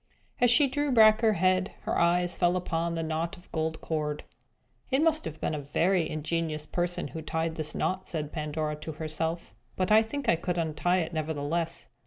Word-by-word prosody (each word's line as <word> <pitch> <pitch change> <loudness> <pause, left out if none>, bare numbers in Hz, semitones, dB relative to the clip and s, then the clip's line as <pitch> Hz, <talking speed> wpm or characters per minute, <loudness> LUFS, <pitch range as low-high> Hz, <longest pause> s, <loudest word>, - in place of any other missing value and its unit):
As 245 - +5
she 275 +4 +6
drew 290 +1 -1
back 220 -2 +6
her 220 -2 +4
head, 185 0 +1
her - - -2
eyes 175 +1 +2
fell 175 0 +2
upon 170 -2 -1
the 165 - -2
knot 160 +1 -2
of 175 - -19
gold 160 0 -2
cord. 150 -2 -2 0.7
"It 270 +3 +2
must 320 -1 +2
have 160 -1 -6
been - - -1
a 150 - -2
very 165 +5 +1
ingenious 155 0 -2
person 175 +2 -2
who 160 - -6
tied 160 +1 -2
this 155 -1 -2
knot," 185 0 -1
said 150 -3 -4
Pandora 150 -1 -3
to 155 +1 -6
herself. 160 -3 -3 0.2
"But 185 +2 0
I 215 +1 +8
think 260 +4 -5
I 200 - +4
could 175 +1 -2
untie 170 +3 +1
it 165 +1 -4
nevertheless. 160 +1 -2
165 Hz, 195 wpm, -28 LUFS, 155-185 Hz, 0.7 s, I